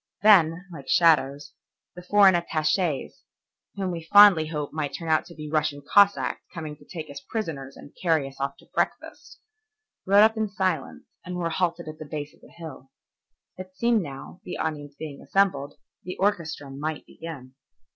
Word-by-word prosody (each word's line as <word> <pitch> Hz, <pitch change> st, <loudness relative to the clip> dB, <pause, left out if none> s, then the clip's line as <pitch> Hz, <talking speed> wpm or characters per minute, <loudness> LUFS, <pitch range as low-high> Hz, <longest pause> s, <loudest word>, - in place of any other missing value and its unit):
Then, 180 Hz, -4 st, +5 dB
like 135 Hz, -4 st, -10 dB
shadows, 145 Hz, -1 st, +3 dB, 0.4 s
the 180 Hz, -, -9 dB
foreign 195 Hz, +1 st, +5 dB
attaches, 160 Hz, -2 st, -1 dB, 0.5 s
whom 190 Hz, -2 st, -2 dB
we 170 Hz, -1 st, -4 dB
fondly 205 Hz, -6 st, +8 dB
hoped 150 Hz, -2 st, -4 dB
might 150 Hz, -2 st, -3 dB
turn 165 Hz, -1 st, -6 dB
out 155 Hz, -, +2 dB
to 170 Hz, -, -13 dB
be 150 Hz, 0 st, -7 dB
Russian 150 Hz, -2 st, -1 dB
Cossacks 200 Hz, 0 st, +3 dB
coming 155 Hz, -3 st, -6 dB
to -, -, -19 dB
take 160 Hz, -4 st, -7 dB
us 140 Hz, -, -7 dB
prisoners 150 Hz, -11 st, -4 dB
and 145 Hz, -, -14 dB
carry 160 Hz, -6 st, +2 dB
us 135 Hz, 0 st, -11 dB
off 140 Hz, -, -2 dB
to -, -, -19 dB
breakfast, -, -, -3 dB, 0.7 s
rode 200 Hz, +2 st, +7 dB
up 220 Hz, +1 st, +4 dB
in 220 Hz, -1 st, -1 dB
silence 190 Hz, -2 st, -2 dB, 0.2 s
and 180 Hz, 0 st, -6 dB
were 170 Hz, -2 st, -2 dB
halted 170 Hz, -1 st, -1 dB
at 155 Hz, 0 st, -8 dB
the 155 Hz, -, -8 dB
base 150 Hz, -1 st, -5 dB
of -, -, -25 dB
the -, -, -17 dB
hill. 155 Hz, -6 st, -11 dB, 0.7 s
It 185 Hz, 0 st, -10 dB
seemed 235 Hz, +1 st, +2 dB
now, 145 Hz, +3 st, -9 dB
the -, -, -6 dB
audience 145 Hz, -2 st, -4 dB
being 150 Hz, -3 st, -8 dB
assembled, 160 Hz, -8 st, 0 dB, 0.3 s
the 180 Hz, -, -7 dB
orchestra 160 Hz, -8 st, -1 dB
might 150 Hz, +3 st, -4 dB
begin. 140 Hz, -6 st, -10 dB
160 Hz, 175 wpm, -25 LUFS, 145-185 Hz, 0.7 s, fondly